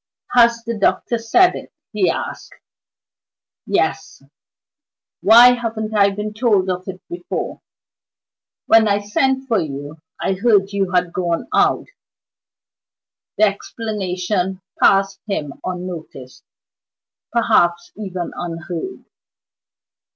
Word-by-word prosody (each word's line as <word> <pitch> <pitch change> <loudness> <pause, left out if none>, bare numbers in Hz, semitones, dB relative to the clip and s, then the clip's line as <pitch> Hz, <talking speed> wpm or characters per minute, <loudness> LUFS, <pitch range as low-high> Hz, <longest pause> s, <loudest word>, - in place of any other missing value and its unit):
"Has 235 -1 +4
the 235 0 -3
doctor 225 +3 0
said 350 +12 +4
it?" - - -9 0.2
he - - +2
asked. - - -5 1.1
"Yes." - - -1 1.0
"Why 240 +2 +8
haven't 225 -2 -4
I 200 -1 +5
been 210 +2 -5
told 210 -5 +2
of 185 +1 -5
it 190 -1 -6
before?" 175 0 -5 1.0
"When 225 -1 +5
I 200 -1 +3
sent 265 +6 0
for 225 -5 +2
you, 145 -1 -6 0.2
I - - 0
heard 205 +1 +3
that 195 +1 -14
you 195 -2 0
had 180 -1 0
gone 170 -2 -2
out." - - +2 1.5
The 215 - +3
explanation 190 -3 -2 0.2
passed 195 0 +3
by 200 - -1
him 145 -2 -5
unnoticed 175 -8 -7 0.9
perhaps 175 -7 +2
even 185 -4 -5
unheard. 175 - -6
195 Hz, 110 wpm, -19 LUFS, 180-225 Hz, 1.5 s, Why